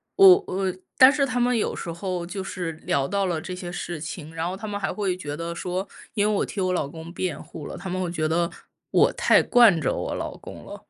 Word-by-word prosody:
我 390 0 +8
我 190 -1 -1 0.2
但 260 +1 +9
是 285 -1 +2
他 250 -2 -1
们 245 0 +2
有 215 - -1
时 170 - -5
候 180 0 -3
就 190 +2 -5
是 180 -3 -4
聊 140 -3 -1
到 200 +3 0
了 170 -4 -1
这 180 - -6
些 180 -1 -6
事 175 -2 -5
情， 160 0 -7
然 165 +1 -2
后 180 - -3
他 215 +3 -7
们 205 -1 -3
还 195 - -1
会 195 -4 -1
觉 145 -5 -5
得 170 +2 -4
说， 180 +3 -3 0.3
因 205 -2 +1
为 215 - +1
我 - - +1
替 200 - -4
我 185 0 +1
老 165 -5 0
公 160 +3 -9
辩 180 -3 -3
护 150 - -9
了， - - -7
他 190 +1 -6
们 185 +1 -2
会 180 - -1
觉 160 -2 -1
得 170 +1 +1 0.4
我 - - +5
太 - - +4
惯 230 -9 +6
着 - - +1
我 - - -3
老 - - -5
公 - - -11
了。 - - -10
185 Hz, 275 characters per minute, -25 LUFS, 170-205 Hz, 0.4 s, 但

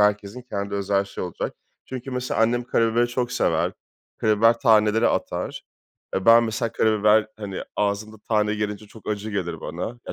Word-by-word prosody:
herkesin 105 +3 +1
kendi 100 -4 -4
özel 100 0 +1
şeyi 100 - -6
olacak." 90 - -4 0.3
Çünkü 130 +1 -7
mesela 125 -2 -2
annem 120 +2 +2
karabiberi 115 0 +2
çok 120 0 -2
sever. - - +1 0.5
Karabiber 115 +2 +4
taneleri 110 -2 +4
atar. - - -2 0.5
E, 95 - -2
ben 115 +1 +8
mesela 115 0 -2
karabiber, 110 0 +3
hani, 100 -3 -5
ağzımda 105 +1 -1
tane 105 -1 +2
gelince 105 0 -3
çok 110 +2 -13
acı 105 0 -3
gelir 85 -5 -3
bana. 110 +8 -5
Ya, - - -4
110 Hz, 160 wpm, -24 LUFS, 100-115 Hz, 0.5 s, ben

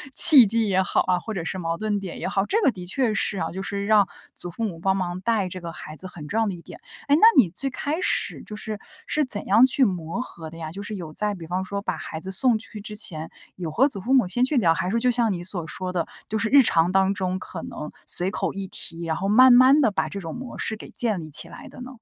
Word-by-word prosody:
契 285 -8 +10
机 225 +1 0
也 190 -1 +2
好 185 - +1
啊， 180 -1 0
或 220 - -6
者 175 - -3
是 185 +2 -4
矛 165 -1 -3
盾 210 0 -1
点 190 -3 -7
也 - - -3
好。 195 0 0
这 440 - +1
个 270 - +4
的 180 -4 -9
确 235 +2 0
是 205 -1 -1
啊， 165 - -3
就 190 - -6
是 200 +1 -4
让 210 -2 +4 0.3
祖 175 - -1
父 200 +7 -6
母 170 -6 -5
帮 190 +2 +1
忙 180 -1 -3
带 215 -3 0
这 185 0 -8
个 170 -1 -6
孩 155 -1 -10
子 185 - -8
很 165 -5 -10
重 215 +8 -1
要 - - +2
的 195 - -2
一 170 - -10
点。 - - -12 0.3
哎， 285 - +4
那 - - +1 0.2
你 215 -10 +6
最 270 +10 -1
开 290 +5 -3
始 - - -1
就 210 - -9
是 210 0 -6 0.3
是 305 -1 0
怎 215 -5 +2
样 225 +6 +6
去 265 +1 +2
磨 180 +2 -3
合 165 -9 -9
的 165 - -12
呀， 160 -1 -6
就 195 +3 -7
是 210 +1 -6
有 170 -5 -7
在 210 +4 -1
比 170 -3 -9
方 180 +2 -2
说 200 +1 -4
把 - - -3
孩 160 - -7
子 190 - -6
送 235 +4 +4
去 215 0 -10
之 210 0 -8
前， 160 -7 -3 0.3
有 175 -3 -4
和 265 - +3
祖 215 -8 -5
父 250 +7 -1
母 255 -8 +4
先 245 +8 0
去 270 +2 +1
聊。 170 -9 +4
还 180 - -3
是 - - -2
说 230 - +1
就 250 +1 +2
像 235 -3 +1
你 175 -1 -5
所 175 -3 -2
说 185 +1 -5
的， 170 -2 -1 0.2
就 220 - -2
是 225 0 -1
日 280 +2 +7
常 170 -5 +2
当 195 +1 +2
中 185 -1 -2
可 175 -2 -8
能 150 - -7 0.2
随 185 +2 0
口 - - -2
一 195 0 -5
提， 170 -2 -4
然 160 -1 -1
后 190 +3 -2
慢 255 +5 +7
慢 260 +4 +6
地 225 - +3
把 160 -5 -1
这 200 - -6
种 165 -1 -6
模 250 0 -8
式 220 - -2
给 - - -11
建 220 -6 -1
立 155 -2 -8
起 150 - -2
来 - - -11
的 - - -12
呢？ 250 - -8
195 Hz, 310 characters per minute, -24 LUFS, 175-230 Hz, 0.3 s, 契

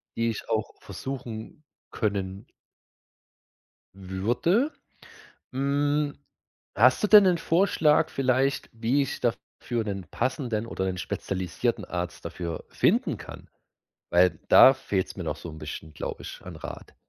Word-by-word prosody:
die 115 0 +1
ich 115 - -5
auch 110 0 0
versuchen 125 0 -7 0.3
können 100 -3 -2 1.5
würde. 115 - 0 0.8
Hm, 145 +2 0 0.6
hast 125 - +4
du - - +4
denn 210 -1 +9
'nen 180 -2 +4
Vorschlag 165 -3 +3
vielleicht, 135 +1 +1
wie 115 +5 +1
ich 135 - -3
dafür 120 0 -2
'nen 100 -4 -4
passenden 120 -3 -1
oder 95 -4 -3
'nen 95 -1 -2
spezialisierten 95 +6 -2
Arzt 90 -1 -5
dafür 85 -3 -5
finden - - +2
kann? - - -11 0.6
Weil 90 +1 +4
da 135 - +9
fehlt's 100 -7 -2
mir - - -5
noch - - -2
so 85 - -9
'n 80 - -8
bisschen, 80 0 -8
glaube - - -5
ich, - - -9
an - - -9
Rat. - - -9
115 Hz, 130 wpm, -27 LUFS, 95-140 Hz, 1.5 s, denn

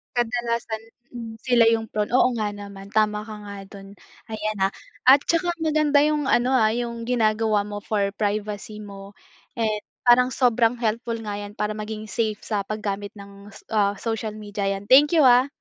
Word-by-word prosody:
Kadalasan 235 -2 -1 0.3
mm, 230 -2 -8
sila 245 -3 +4
yung 225 -1 -2
prone. 210 +2 -2
Oo 255 0 +5
nga 210 -1 -2
naman 200 -1 -10
tama 210 -1 +1
ka 220 - -8
nga 200 0 -8
do'n, 195 0 -13 0.3
ayan, 215 -1 -3
ah. 195 +1 +2 0.4
At 275 +1 +7
saka 340 +1 +1
maganda 305 -2 +2
yung 300 -2 0
ano, 250 +2 +2
ah, 220 -4 +4
yung 235 0 -3
ginagawa 220 -3 +1
mo 205 0 -6
for 200 -2 -1
privacy 210 0 -3
mo, 200 -1 -11 0.4
and 215 -2 0 0.2
parang 250 +1 +6
sobrang 240 -2 +3
helpful 230 +1 -2
nga 205 -2 -5
'yan 205 +1 -8
para 210 0 -1
maging 215 0 -6
safe 220 -3 -1
sa 210 -2 -1
paggamit 205 -1 -3
ng 200 0 -12 0.3
ah 205 -1 +2
social 220 -1 -3
media 205 -1 -4
'yan. 195 0 -3
Thank 290 +7 +6
you, 300 - +6
ah. 250 +1 +6
215 Hz, 175 wpm, -23 LUFS, 205-240 Hz, 0.4 s, At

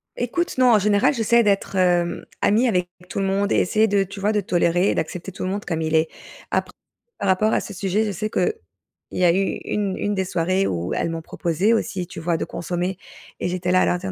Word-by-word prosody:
Ecoute, 260 +7 -2
non, 250 -2 +5
en 210 - +6
général, 210 +7 +3
j'essaie 235 0 +3
d'être, 200 -1 0
hem, 175 -2 +1 0.2
amie 230 +5 +3
avec 180 -5 0 0.2
tout - - -3
le 195 - 0
monde 200 +1 0
et - - +3
essayer 220 +4 +3
de 200 -1 +2
tu 195 +1 -9
vois, 205 +2 +1
de 210 -1 +1
tolérer 175 +1 +2
et - - 0
d'accepter 180 +4 -4
tout 185 - -7
le 185 - -1
monde 205 +2 -3
comme 165 -2 -2
il 160 0 0
est. 160 0 +3 0.4
Apr - - 0 0.5
par 200 - -2
rapport 215 +4 +3
à - - +3
ce 205 - -8
sujet, 195 +3 0
je 205 - -2
sais 215 +3 -3
qu'il 440 - +1 0.6
y 185 - -1
a 170 - +6
eu 195 - +2 0.2
1- 200 -2 -1
1 205 0 -1
des 190 - 0
soirées 185 +2 0
où 85 +1 -2
elles - - -1
m'ont 165 0 -4
proposé 175 +9 0
aussi, 195 -6 -1
tu 165 - -8
vois, 165 0 0
de - - -2
consommer 180 +2 -3 0.4
et - - -1
j'étais 180 0 -1
là, 185 - +4
à - - +4
leur 180 - +1
dire: 190 0 -4
190 Hz, 245 wpm, -22 LUFS, 175-210 Hz, 0.6 s, en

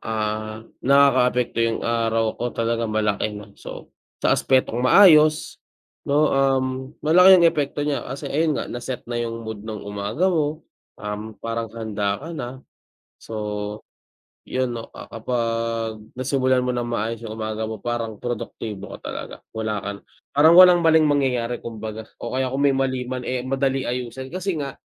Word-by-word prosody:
ah, 110 0 -3 0.2
nakakaapekto 125 -3 +3
'yung 115 -1 +1
araw 115 -1 +1
ko 120 - 0
talaga 115 0 0
malaki 105 -1 0
'no. 105 -1 -11
So, - - -9 0.3
sa - - +5
aspetong 130 -3 +2
maayos 155 +2 +5 0.5
'no, 150 +2 +3
um, 135 -1 +2 0.4
malaki 180 +4 +8
'yung 175 - +4
epekto 145 -3 +1
niya, 145 -1 0
kasi 135 +1 -6
ayun 155 0 +1
nga - - -2
na-set 120 +1 -6
na 120 0 -3
'yung 115 -1 -4
mood 110 -2 -6
ng 105 -2 -6
umaga 105 - -1
mo. 155 -1 -1 0.3
Um, 105 +1 -6
parang 115 0 -4
handa 105 -3 -1
ka 165 - -6
na, 130 -3 -7 0.5
so 115 - -10 1.1
'yun 130 -1 -1
'no, 115 - -7
ah, - - -10
kapag 115 -1 -2 0.2
nasimulan 130 0 +1
mo 125 - -1
ng 120 -1 -2
maayos 115 -1 -2
'yung 110 - -6
umaga 110 0 -3
mo 110 -1 -7
parang 115 -2 -2
produktibo 110 -3 -5
ka - - -7
talaga. - - -7
Wala 110 -2 -3
ka 100 - -3
na - - -21 0.3
parang 155 +4 +6
walang 180 -1 +9
maling 160 0 +6
mangyayari 125 -4 0
kumbaga 110 -1 -6 0.2
o 120 - -4
kaya 130 - +1
kung 135 +2 -1
may 140 -1 +4
mali 130 -1 0
man, 125 -1 -4
eh, 125 -1 -2
madali 135 +1 0
ayusin. 125 +1 -5
Kasi 185 +1 -2
nga, 140 -3 -5
120 Hz, 165 wpm, -23 LUFS, 110-135 Hz, 1.1 s, walang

